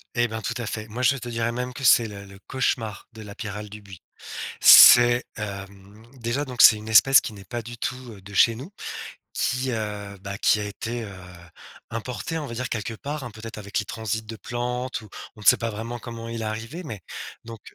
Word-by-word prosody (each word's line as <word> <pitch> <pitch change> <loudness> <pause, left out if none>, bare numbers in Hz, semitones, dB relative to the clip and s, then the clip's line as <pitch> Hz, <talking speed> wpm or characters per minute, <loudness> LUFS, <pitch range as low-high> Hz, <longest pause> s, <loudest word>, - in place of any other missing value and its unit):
Et 120 0 +2
ben, 110 0 -5
tout 120 - -3
à 120 - -4
fait, 110 0 -5
moi, 115 +4 -5
je 140 +2 +4
te 120 -1 -7
dirais 115 0 -1
même 125 +1 -4
que 135 - -8
c'est 115 -2 +6
le 100 -2 -9
le 100 0 -14
cauchemar 115 -6 -2
de 110 - -11
la 100 -1 -10
pyrale 105 -1 -6
du 105 +1 -10
buis. 95 -4 -13 0.6
C'est, 120 0 +9
hem, 100 0 -8
déjà, 120 +4 -2
donc 125 -3 +1
c'est 110 - +9
une 105 +1 -9
espèce 135 +5 +7
qui - - -6
n'est 100 -2 -12
pas 120 +5 -5
du 120 +2 -9
tout, 125 - -2 0.2
heu, 100 - -13
de 100 +2 -12
chez 115 +4 +5
nous, 135 - -9 0.6
qui, 130 +1 -1
heu, 105 -2 -4
bah, 100 0 -6
qui 105 - +3
a - - -3
été, 115 +3 -5
heu, 105 - -8 0.8
importée, 125 +7 -4
on 150 - -4
va 120 - -7
dire 125 +1 -3
quelque 110 -1 -3
part, 145 +4 -5
hein, 120 - -6
peut-être 115 +2 -9
avec 100 -1 -3
les 105 - -2
transits 110 0 -3
de 110 +1 -7
plantes 125 +2 -3
ou, 110 - -14 0.3
on - - -13
ne 105 - -10
sait - - +8
pas 115 -1 -3
vraiment 115 +3 -5
comment 115 0 -8
il 115 -1 -5
est - - -3
arrivé, 110 +10 -5
mais 110 - -7 0.4
donc 115 -1 -9
115 Hz, 230 wpm, -24 LUFS, 105-120 Hz, 0.8 s, C'est